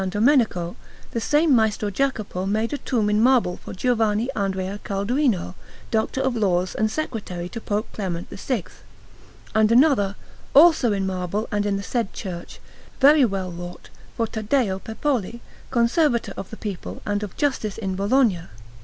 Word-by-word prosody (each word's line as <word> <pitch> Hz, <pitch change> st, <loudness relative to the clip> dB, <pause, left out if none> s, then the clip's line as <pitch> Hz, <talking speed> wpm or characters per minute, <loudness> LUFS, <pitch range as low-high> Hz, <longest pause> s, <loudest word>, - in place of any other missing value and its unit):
Domenico, 205 Hz, -, +2 dB, 0.4 s
the 230 Hz, -, -2 dB
same 295 Hz, +4 st, +3 dB
Maestro 215 Hz, -2 st, +1 dB
Jacopo 215 Hz, -7 st, -1 dB
made 220 Hz, +5 st, 0 dB
a 290 Hz, -, -2 dB
tomb 225 Hz, -5 st, 0 dB
in 210 Hz, +1 st, +2 dB
marble 240 Hz, -7 st, +3 dB
for -, -, -10 dB
Giovanni 225 Hz, +2 st, +1 dB
Andrea 195 Hz, 0 st, -2 dB
Calduino, 200 Hz, -, 0 dB, 0.4 s
Doctor 225 Hz, +4 st, 0 dB
of 265 Hz, -2 st, 0 dB
Laws 185 Hz, -4 st, +1 dB
and 215 Hz, 0 st, +1 dB
Secretary 210 Hz, -, -4 dB
to 230 Hz, -, -7 dB
Pope 210 Hz, +1 st, -2 dB
Clement 180 Hz, -4 st, -4 dB
VI; 230 Hz, -1 st, -2 dB, 0.9 s
and 220 Hz, 0 st, +4 dB
another, 235 Hz, -6 st, +4 dB, 0.4 s
also 305 Hz, -6 st, +7 dB
in 195 Hz, -1 st, 0 dB
marble 190 Hz, +3 st, -2 dB
and 205 Hz, 0 st, 0 dB
in 200 Hz, -1 st, 0 dB
the 200 Hz, -, -5 dB
said 230 Hz, -2 st, -2 dB
church, 175 Hz, -4 st, -7 dB, 0.4 s
very 290 Hz, +1 st, +7 dB
well 195 Hz, -4 st, -2 dB
wrought, 175 Hz, +1 st, -9 dB, 0.3 s
for 230 Hz, -, +1 dB
Taddeo 220 Hz, -2 st, 0 dB
Peppoli, 235 Hz, +1 st, -2 dB, 0.3 s
Conservator 235 Hz, -, +2 dB
of 195 Hz, -, -7 dB
the 220 Hz, -, -9 dB
people 200 Hz, -4 st, -6 dB
and 205 Hz, 0 st, -1 dB
of 205 Hz, -3 st, -7 dB
Justice 260 Hz, -8 st, -1 dB
in 195 Hz, -4 st, -3 dB
Bologna. 200 Hz, -3 st, +2 dB
215 Hz, 155 wpm, -23 LUFS, 195-245 Hz, 0.9 s, also